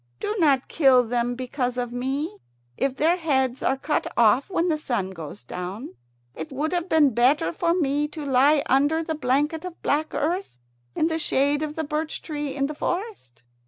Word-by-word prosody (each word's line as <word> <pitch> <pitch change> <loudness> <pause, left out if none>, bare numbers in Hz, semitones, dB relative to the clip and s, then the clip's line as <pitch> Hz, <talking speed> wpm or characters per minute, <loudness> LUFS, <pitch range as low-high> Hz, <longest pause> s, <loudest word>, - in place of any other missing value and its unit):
Do 420 - -2
not 280 -6 +3
kill 265 -5 +5
them 240 +1 -1
because 250 0 -3
of 245 -1 -3
me. 265 0 -3 0.4
If 270 - -1
their 330 +5 +3
heads 265 -6 0
are 265 - +1
cut 300 +3 -1
off 235 - +4
when 360 -2 0
the 315 -3 +1
sun 220 -10 -2
goes 160 -8 -9
down, 180 - -6 0.4
it 160 - -7
would 295 +4 -2
have 350 +1 -1
been 295 -5 +4
better 240 - +3
for 340 - +1
me 295 -3 +1
to 300 0 -7
lie 280 +2 +4
under 290 +5 +2
the 320 - -3
blanket 295 +3 0
of 365 -2 -8
black 305 +2 0
earth 340 - -2 0.4
in - - +2
the 325 0 0
shade 285 -1 +1
of 305 -1 -3
the 320 - -2
birch 305 +1 -3
tree 295 -3 -4
in 275 -1 0
the 300 - -3
forest." 350 - -5
285 Hz, 190 wpm, -24 LUFS, 250-315 Hz, 0.4 s, kill